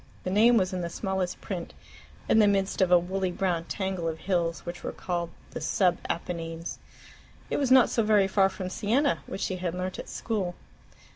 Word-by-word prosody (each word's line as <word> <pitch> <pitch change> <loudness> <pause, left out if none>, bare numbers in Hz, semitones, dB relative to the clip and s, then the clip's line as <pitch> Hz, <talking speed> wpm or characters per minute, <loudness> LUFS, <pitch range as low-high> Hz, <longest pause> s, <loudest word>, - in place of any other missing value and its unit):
The 185 - -2
name 230 +4 +6
was 185 -2 +1
in 180 - -2
the 170 - -3
smallest 190 -1 -2
print, 180 -4 -5 0.5
in 220 - +5
the 210 - +6
midst 195 -1 +1
of 185 -1 +3
a 180 - +9
woolly 185 +2 -1
brown 175 -2 -1
tangle 190 -3 -2
of 160 -1 -2
hills 170 -3 -1
which 175 0 -6
were - - -3
called 175 -2 -3 0.2
the - - -6
"Sub 180 -3 +2
Apennines." 165 -1 -4 0.7
It - - +1
was 275 -3 +1
not 255 -1 +7
so 230 - +1
very 210 -3 +4
far 195 0 +3
from 185 -1 -6
Siena, 255 +10 +1
which - - -5
she 185 - -1
had 180 -1 -3
learnt 185 +1 -4
at - - -7
school. 195 -6 -2
185 Hz, 200 wpm, -28 LUFS, 175-200 Hz, 0.7 s, a